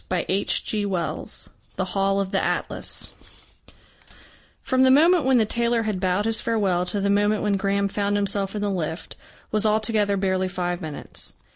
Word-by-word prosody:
CHAPTER 200 +3 0
VI 180 -4 -2 0.5
THE 190 - -1
HALL 195 +1 +1
OF 195 -1 -2
THE - - +1
ATLAS - - -5 1.0
From 260 0 +1
the 260 - +6
moment 320 +4 +5
when 265 -1 +4
the 225 - +4
tailor 235 +1 +1
had 215 -4 -2
bowed 185 +2 0
his 225 -1 0
farewell 195 -6 0
to 200 +3 -1
the 200 0 +1
moment 205 +1 +2
when 205 -1 +2
Graham 200 0 +1
found 205 0 -1
himself 200 0 -1
in 210 - -2
the 205 - 0
lift, 165 -3 -4 0.4
was 215 0 +1
altogether 215 -1 +2
barely 190 -1 0
five 180 -1 -3
minutes. 155 -3 -5
200 Hz, 165 wpm, -24 LUFS, 190-215 Hz, 1.0 s, the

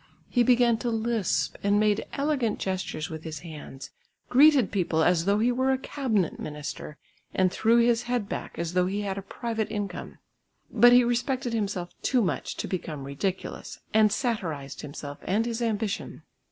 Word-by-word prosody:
He 245 - +2
began 240 -1 +4
to 240 - -1
lisp 225 -3 0
and 205 +1 +3
made 210 0 +1
elegant 275 -6 0
gestures 185 -5 -3
with 160 0 -6
his 155 -3 -6
hands, 150 -5 -9 0.4
greeted 275 -4 +6
people 170 -5 +1
as 170 -1 +3
though 200 +1 +3
he 235 +3 +3
were 260 +2 +1
a 265 - +2
cabinet 240 - -1
minister, 150 0 -6 0.4
and 185 -1 +3
threw 225 +4 +3
his 235 0 +4
head 245 -4 -2
back - - -6
as 170 0 -3
though 180 0 +2
he 200 +2 -2
had 195 -1 -3
a - - -6
private 225 +2 -3
income. 205 -4 -5 0.5
But 240 0 +7
he 245 0 +7
respected 245 +1 -1
himself 200 -5 -2
too 250 -3 +2
much 185 - -2
to - - -3
become 155 -6 -4
ridiculous 145 +8 -4 0.2
and 215 -1 +5
satirised 165 - -2
himself 145 0 -7
and 210 +5 0
his 235 0 -3
ambition. 220 -1 -2
210 Hz, 170 wpm, -27 LUFS, 180-240 Hz, 0.5 s, But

